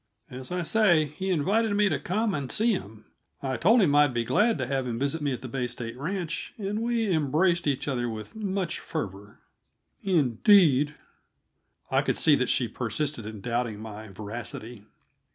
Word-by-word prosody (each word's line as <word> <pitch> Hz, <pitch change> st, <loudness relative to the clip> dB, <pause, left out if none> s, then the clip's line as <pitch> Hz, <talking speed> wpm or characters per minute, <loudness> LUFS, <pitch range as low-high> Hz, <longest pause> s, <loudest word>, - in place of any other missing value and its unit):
As 130 Hz, +3 st, -7 dB
I 180 Hz, -1 st, -1 dB
say, 175 Hz, -5 st, +4 dB
he 155 Hz, +7 st, -5 dB
invited 205 Hz, +6 st, +1 dB
me 205 Hz, 0 st, +4 dB
to 150 Hz, -8 st, 0 dB
come 210 Hz, +6 st, -1 dB
and 140 Hz, -5 st, -3 dB
see 225 Hz, +2 st, +3 dB
him; 110 Hz, -, -5 dB, 0.4 s
I 130 Hz, -1 st, -1 dB
told 215 Hz, -, +4 dB
him 150 Hz, -6 st, +3 dB
I 145 Hz, 0 st, +6 dB
should 130 Hz, -, -8 dB
be 120 Hz, -, +1 dB
glad 210 Hz, -, +2 dB
to 130 Hz, -, -2 dB
have 135 Hz, 0 st, -1 dB
him 115 Hz, -2 st, -3 dB
visit 140 Hz, +5 st, -1 dB
me 145 Hz, -1 st, 0 dB
at 125 Hz, -, -5 dB
the -, -, -5 dB
Bay 125 Hz, 0 st, -2 dB
State 120 Hz, -1 st, -6 dB
Ranch, 165 Hz, +4 st, -4 dB
and 210 Hz, +1 st, -3 dB
we 230 Hz, -3 st, 0 dB
embraced 160 Hz, +3 st, +2 dB
each 140 Hz, -1 st, -1 dB
other 120 Hz, -3 st, -1 dB
with 110 Hz, -, -7 dB
much 195 Hz, -4 st, -2 dB
fervor." 100 Hz, -, -6 dB, 0.6 s
"Indeed!" 150 Hz, -, +4 dB, 1.0 s
I -, -, +4 dB
could -, -, -1 dB
see -, -, +4 dB
that -, -, 0 dB
she -, -, +2 dB
persisted 145 Hz, -8 st, -3 dB
in 110 Hz, -2 st, -8 dB
doubting 120 Hz, -1 st, -2 dB
my 110 Hz, 0 st, -8 dB
veracity. 110 Hz, +2 st, -7 dB
145 Hz, 185 wpm, -27 LUFS, 120-190 Hz, 1.0 s, I